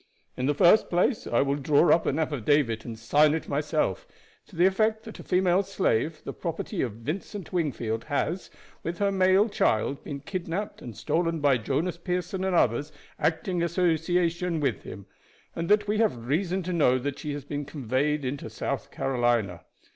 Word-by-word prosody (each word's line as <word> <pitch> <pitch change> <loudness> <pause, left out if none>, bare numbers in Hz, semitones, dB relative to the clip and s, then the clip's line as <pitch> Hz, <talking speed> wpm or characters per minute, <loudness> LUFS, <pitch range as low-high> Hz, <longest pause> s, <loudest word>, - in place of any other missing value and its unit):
In 125 - -1
the 145 - +1
first 175 +9 +5
place, 185 +7 +1
I 120 - +2
will 140 0 0
draw 145 +4 +4
up 170 - +1
an 140 - 0
affidavit 145 -6 +1
and 115 -2 -6
sign 150 +7 +3
it 160 - -4
myself, 150 - -1 0.4
to 195 - -16
the 175 +2 +4
effect 215 +3 +2
that 220 - -10
a - - -8
female 180 0 +2
slave, 165 - -1
the - - -5
property 170 +3 -4
of 120 -5 -2
Vincent 165 - -6
Wingfield, 120 -10 -2
has, 165 +5 -2 0.3
with 170 +1 -4
her 200 -1 +1
male 190 +2 +4
child, 135 - 0
been 140 -2 -6
kidnaped 185 +4 -4
and 120 - -9
stolen 165 +8 0
by 140 -4 +3
Jonas 150 +10 -1
Pearson 180 +1 -3
and 190 -1 0
others 145 +1 +2 0.3
acting 170 +3 0
in - - +1
association 170 0 +1
with 135 -8 -1
him, 100 - -9 0.5
and 165 0 -3
that 210 0 +4
we 210 +1 0
have 125 - +1
reason 180 +7 0
to 180 +1 -3
know 135 -6 +3
that 140 +2 -4
she 150 -2 -4
has 145 -2 -6
been 145 0 -4
conveyed 140 +1 -1
into 140 +2 -4
South - - -4
Carolina. 120 -8 0
160 Hz, 180 wpm, -27 LUFS, 135-180 Hz, 0.5 s, first